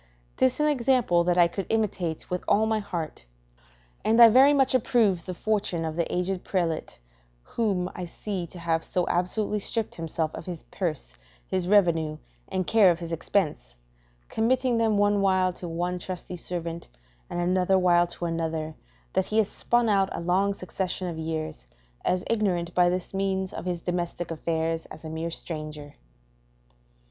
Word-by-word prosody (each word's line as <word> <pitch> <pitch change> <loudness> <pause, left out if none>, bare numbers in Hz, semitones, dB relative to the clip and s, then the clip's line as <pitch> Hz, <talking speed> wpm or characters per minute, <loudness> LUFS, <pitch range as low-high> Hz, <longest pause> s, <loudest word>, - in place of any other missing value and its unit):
'Tis 130 - +3
an 300 - +3
example 250 -10 +3
that 175 0 +1
I 175 -1 +6
could 190 +3 -5
imitate 195 -7 -1
with 180 0 -3
all 215 +2 +4
my 220 0 +1
heart; 165 - -5 0.8
and 225 +2 +3
I 235 -1 +11
very 265 +5 +7
much 270 -3 +3
approve 220 -8 +2
the 185 - -4
fortune 195 -5 -1
of 160 -1 -3
the 170 0 -1
aged 180 +1 -1
prelate 170 -4 -2 0.5
whom 195 - -1
I 180 - -5
see 180 0 -4
to 180 - -12
have 165 -1 0
so 180 -1 0
absolutely 205 +4 0
stripped 225 +2 0
himself 160 -1 -3
of - - -8
his 175 -3 -6
purse, 155 - -3 0.3
his 185 -2 -1
revenue, 165 -6 +3 0.3
and 185 -1 -2
care 215 -2 +5
of 170 - +2
his 170 -1 -5
expense, 155 - -1 0.5
committing 245 +1 +1
them 220 -2 +2
one 205 0 +3
while 185 -2 +2
to 175 - -7
one 175 +2 -2
trusty 180 0 -6
servant, 170 -1 -5 0.4
and - - -3
another 185 +2 +2
while 175 -1 +4
to 175 - -5
another, 160 -1 -2 0.4
that 190 - +2
he 215 - -2
has 215 -2 +3
spun 240 -1 +1
out 195 -2 +3
a - - -4
long 190 +4 +1
succession 185 -1 -3
of 165 -2 -6
years, 155 - -4 0.4
as 180 0 +1
ignorant, 180 -6 0
by 180 -1 +4
this 180 +1 -3
means, 190 -1 -1
of - - -6
his 180 -1 -2
domestic 175 0 -3
affairs 165 0 -2
as 160 - -11
a 155 - -5
mere 160 +1 -3
stranger. 155 -3 -5
180 Hz, 170 wpm, -26 LUFS, 165-200 Hz, 0.8 s, I